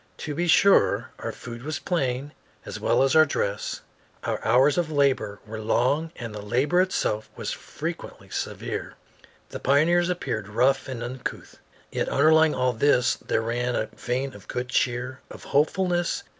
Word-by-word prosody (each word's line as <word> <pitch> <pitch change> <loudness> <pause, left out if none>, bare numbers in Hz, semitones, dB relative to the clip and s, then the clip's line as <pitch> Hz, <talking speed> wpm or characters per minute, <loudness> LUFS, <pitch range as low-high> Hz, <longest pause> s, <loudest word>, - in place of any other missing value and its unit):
To 150 - -5
be 175 +4 -1
sure, 200 +4 +4
our - - -4
food 120 0 -9
was 150 +3 -3
plain 140 -5 -2 0.3
as - - -6
well - - +3
as 135 +3 +2
our 155 - +9
dress; 100 -7 -2 0.4
our - - -2
hours 130 +5 +4
of 165 -3 -1
labor 135 -8 +1
were 110 0 -6
long 140 +8 +1
and 115 -3 -7
the 105 - -6
labor 135 - +2
itself 110 - -1
was - - -4
frequently - - -6
severe; - - -4 0.5
the - - -6
pioneers 170 +6 +3
appeared 110 - -3
rough 130 +5 +2
and 125 -3 -5
uncouth. 125 +1 -6 0.3
Yet - - -1
underlying 160 +2 +4
all 125 -1 +1
this 125 +1 +3
there 110 - -1
ran 120 +2 -1
a 110 - -1
vein 130 +2 -2
of 100 - -14
good 125 0 -4
cheer, 125 +1 -1
of - - -11
hopefulness. 175 +4 +1
130 Hz, 160 wpm, -25 LUFS, 120-155 Hz, 0.5 s, our